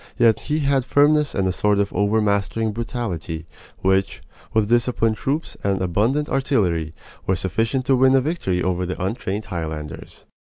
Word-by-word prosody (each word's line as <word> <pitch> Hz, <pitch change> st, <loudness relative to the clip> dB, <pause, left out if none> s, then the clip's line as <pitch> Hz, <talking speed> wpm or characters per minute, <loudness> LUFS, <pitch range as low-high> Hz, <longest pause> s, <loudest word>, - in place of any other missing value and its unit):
Yet 115 Hz, -2 st, +4 dB
he 155 Hz, +1 st, +1 dB
had 140 Hz, -2 st, +2 dB
firmness 145 Hz, +2 st, +3 dB
and 95 Hz, -1 st, +1 dB
a -, -, +1 dB
sort 105 Hz, +2 st, +1 dB
of 100 Hz, 0 st, 0 dB
overmastering 105 Hz, +1 st, +1 dB
brutality, 100 Hz, -8 st, -4 dB, 0.4 s
which, 95 Hz, 0 st, +1 dB, 0.3 s
with 110 Hz, -2 st, +2 dB
disciplined 115 Hz, -1 st, +2 dB
troops 145 Hz, +9 st, -2 dB
and 100 Hz, -1 st, +1 dB
abundant 110 Hz, -, +1 dB
artillery, 90 Hz, -, 0 dB, 0.3 s
were 95 Hz, -, +3 dB
sufficient 115 Hz, +8 st, -1 dB
to 135 Hz, -, +4 dB
win 130 Hz, +1 st, +5 dB
a 135 Hz, -, +4 dB
victory 125 Hz, -, -1 dB
over 90 Hz, 0 st, 0 dB
the 90 Hz, -, -4 dB
untrained 100 Hz, +1 st, -3 dB
Highlanders. 80 Hz, -4 st, -6 dB
105 Hz, 155 wpm, -22 LUFS, 95-130 Hz, 0.4 s, win